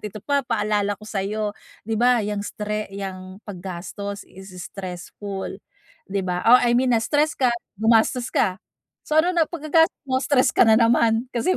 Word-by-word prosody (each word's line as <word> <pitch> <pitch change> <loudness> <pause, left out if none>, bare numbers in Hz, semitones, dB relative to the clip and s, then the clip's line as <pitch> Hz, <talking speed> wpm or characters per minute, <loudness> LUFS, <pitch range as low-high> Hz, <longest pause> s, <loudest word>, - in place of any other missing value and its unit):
ito 210 0 -6
pa 285 -1 +2
paalala 210 -3 0
ko 215 - -11
sayo, 210 +1 -2 0.3
di 220 0 -2
ba, 245 0 +4
yang 205 0 -2
stre 210 -1 -4
yang 190 0 -7
pag-gastos 195 +1 -6
is 190 0 -13
stressful, 190 +2 -6 0.6
di 200 0 -2
ba? 180 -1 -3
Oh, 245 +2 +7
I 240 0 +3
mean 255 0 +2
na-stress 295 +7 +2
ka, 255 -2 +3 0.3
gumastos 230 +2 +3
ka, 190 +2 +1 0.4
so 305 - -1
ano 350 +3 +4
na 335 -2 +3
pagka-gastos 325 +1 +1
mo 260 - +1
stress 260 -1 +3
ka - - +5
na 220 - +6
naman? 230 0 +3
Kasi 330 +11 +1
215 Hz, 165 wpm, -23 LUFS, 200-250 Hz, 0.6 s, Oh